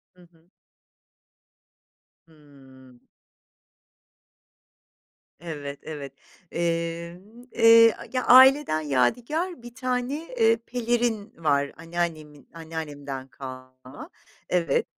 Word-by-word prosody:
Hı 180 - -20
hı. 165 +1 -29 1.8
Hıı. 135 -5 -19 2.4
Evet, 145 -4 -7
evet. 145 -3 -8 0.4
Eee, 170 +1 -3 0.3
eee, 230 0 +6 0.2
ya 255 - 0
aileden 260 - +6
yadigar 240 - -1
bir 240 0 -11
tane, 255 +6 -3
eee, 225 0 +4
pelerin 235 -3 -1
var 140 -1 +1
anneannemin, 160 -3 -5
anneannemden 145 -5 -7
kalma. 130 0 -11 0.4
Evet 170 -5 +1
165 Hz, 75 wpm, -25 LUFS, 140-230 Hz, 2.4 s, eee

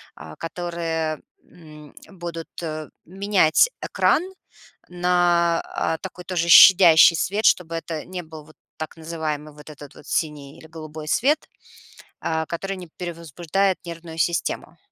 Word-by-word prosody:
а, 75 0 -11
которые, 165 -2 -3 0.2
м, 150 -3 -15 0.2
будут, 170 -3 -7 0.2
э, 155 -1 -5 0.2
менять 195 - +3
экран 325 - +1 0.7
на, 175 -1 +2
а, 160 0 -2
такой 180 -1 -9
тоже 170 -1 -1
щадящий 170 -2 +8
свет, 205 +6 -1
чтобы 165 -2 +3
это 165 -1 -5
не 180 0 -6
был 155 -2 -12
вот 155 - -19 0.2
так 155 - -6
называемый 155 -2 -5
вот 150 +1 -14
этот 145 -1 -12
вот - - -15
синий 150 -3 -3
или 160 - -14
голубой 155 -1 -9
свет, 290 - +1 0.7
а, 160 0 -1
который 195 +3 -4
не 180 -1 -9
перевозбуждает 175 +2 -2
нервную 165 -1 -8
систему. 170 -1 -2
165 Hz, 135 wpm, -23 LUFS, 155-175 Hz, 0.7 s, щадящий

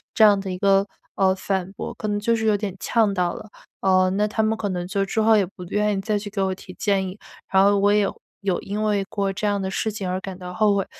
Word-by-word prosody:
这 220 - +5
样 205 -2 +6
的 195 -1 -5
一 180 - -3
个， 195 +1 +3 0.3
呃， 190 -1 +3
反 190 -1 -2
驳， - - -6
可 215 - -5
能 205 -1 0
就 230 +3 +1
是 220 - -2
有 215 -1 +4
点 205 -2 -3
呛 220 -2 +2
到 180 -2 0
了， 215 -1 -9 0.3
呃， 185 -1 +4
那 205 +2 +1
他 215 +1 -1
们 220 0 +1
可 205 - -2
能 180 -1 -3
就 195 0 0
之 220 +3 -1
后 220 0 +5
也 205 -2 +3
不 180 0 -11
愿 210 +2 0
意 - - -1
再 210 +1 0
去 205 0 -5
给 200 -1 -3
我 190 -1 0
提 185 - -12
建 195 -2 +1
议， 190 +3 -10 0.3
然 190 0 +5
后 200 +1 +5
我 200 +1 +3
也 210 - +4
有 200 - -2 0.2
有 195 -3 0
因 205 +2 -4
为 205 -2 +1
过 200 -2 -1
这 200 +2 -3
样 205 -1 +1
的 190 - -2
事 215 +3 -1
情 200 -3 -4
而 185 +1 -1
感 190 -1 -7
到 180 -1 -8
后 210 +1 +3
悔。 195 - -1
200 Hz, 305 characters per minute, -23 LUFS, 190-210 Hz, 0.3 s, 样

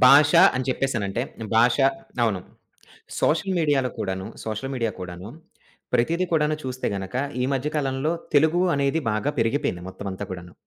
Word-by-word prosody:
భాష 145 +3 +7 0.2
అని 130 - -1
చెప్పేసనంటే 120 -4 -1 0.3
భాష 120 +1 +5 0.5
అవును. 105 -5 +1 0.8
సోషల్ 185 +4 +1
మీడియాలో 145 -6 +2
కూడాను 95 -1 -3 0.2
సోషల్ 110 +5 -4
మీడియా 115 -4 -1
కూడాను 90 +2 -7 0.7
ప్రతిది 170 +9 +2
కూడాను 155 -1 +2
చూస్తే 130 0 -3
గనక 95 +2 -5 0.3
ఈ - - +2
మధ్య 135 +2 -1
కాలంలో 135 +1 0 0.2
తెలుగు 160 +4 +4
అనేది 140 +3 +1
బాగా 110 +7 0
పెరిగిపోయింది 115 -6 0
మొత్తం 95 +2 -8
అంతా 95 +2 -5
కూడాను. 90 -1 -7
130 Hz, 140 wpm, -24 LUFS, 100-145 Hz, 0.8 s, భాష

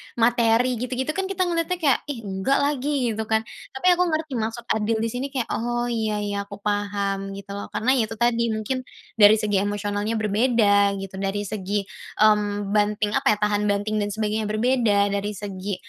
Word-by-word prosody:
materi 235 +1 +2
gitu-gitu 255 +4 -2
kan 385 +4 -2
kita 380 -1 0
ngeliatnya 345 0 0
kayak, 280 -5 +3
"Ih, 260 -6 -5
enggak 195 +7 0
lagi," 280 -3 0
gitu 220 0 -4
kan? 220 0 +1 0.3
Tapi 265 - -5
aku 355 +1 +2
ngerti 310 -3 -2
maksud 225 +2 -3
adil 220 +1 +1
disini 245 +4 -2
kayak, 265 -4 -3
"Oh, 240 +1 -1
iya 215 -2 -1
iya, 205 0 -3
aku 200 - -8
paham" 200 -1 -2
gitu 200 0 -9
loh. 200 0 -5
Karena, 250 +4 0
ya 220 - +1
itu 225 - -7
tadi, 235 +1 +2
mungkin 220 +4 -2 0.4
dari 205 0 +8
segi 210 -2 0
emosionalnya 205 +2 -2
berbeda 210 -2 +3
gitu, 190 0 -7
dari 195 +1 -2
segi, 205 0 -2 0.4
mmm, 205 -1 +2
banting, 210 0 +1
apa - - 0
ya, - - -14
tahan 210 0 +1
banting 205 +1 0
dan 205 - 0
sebagainya 215 +1 -2
berbeda, 215 -2 +2
dari 205 +1 -2
segi 200 0 -5
215 Hz, 180 wpm, -24 LUFS, 205-240 Hz, 0.4 s, dari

